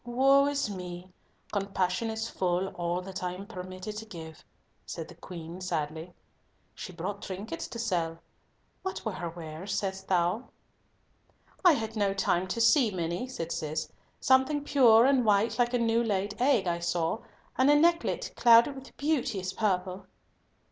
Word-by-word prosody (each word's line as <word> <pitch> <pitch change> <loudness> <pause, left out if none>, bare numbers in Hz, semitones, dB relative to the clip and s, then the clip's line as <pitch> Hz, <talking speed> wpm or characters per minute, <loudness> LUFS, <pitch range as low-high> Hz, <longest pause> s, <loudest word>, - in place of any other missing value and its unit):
"Woe 270 +3 +4
is 285 -2 0
me, 180 -2 -7 0.4
compassion 195 +1 -1
is 220 0 -3
full 185 -2 -1
all 175 0 -2
that 185 0 -7
I 180 -1 -2
am 190 +2 -8
permitted 185 0 -7
to 220 - -6
give," 160 -6 -10 0.4
said 165 -2 -6
the - - -12
Queen, 170 0 -9
sadly; 160 -1 -3 0.6
"she 185 - -8
brought 185 +4 -5
trinkets 190 -2 -5
to - - -8
sell. 175 -8 -1 0.6
What 380 -8 -5
were 220 - 0
her 175 -3 -4
wares, 165 +2 -5
saidst 190 -1 -3
thou?" 185 +6 +1 1.1
"I 355 -3 +8
had 225 -4 -3
no 200 -2 +1
time 185 -1 +1
to 230 - -3
see 230 +1 +5
many," 175 +4 -3
said 170 -10 -5
Cis, 155 0 -3 0.3
"something 265 +3 +3
pure 240 -6 +6
and 265 -2 +4
white 215 +2 +2
like 245 0 +2
a - - +4
new 230 0 +2
laid 205 -2 -1
egg, 250 -7 +3
I 170 -1 0
saw, 170 +3 -1 0.4
and 260 +2 +4
a 295 - +7
necklet, 335 +3 +2
clouded 235 +3 +6
with 270 0 -12
beauteous 235 -11 -1
purple." 190 -2 -1
195 Hz, 160 wpm, -29 LUFS, 180-235 Hz, 1.1 s, I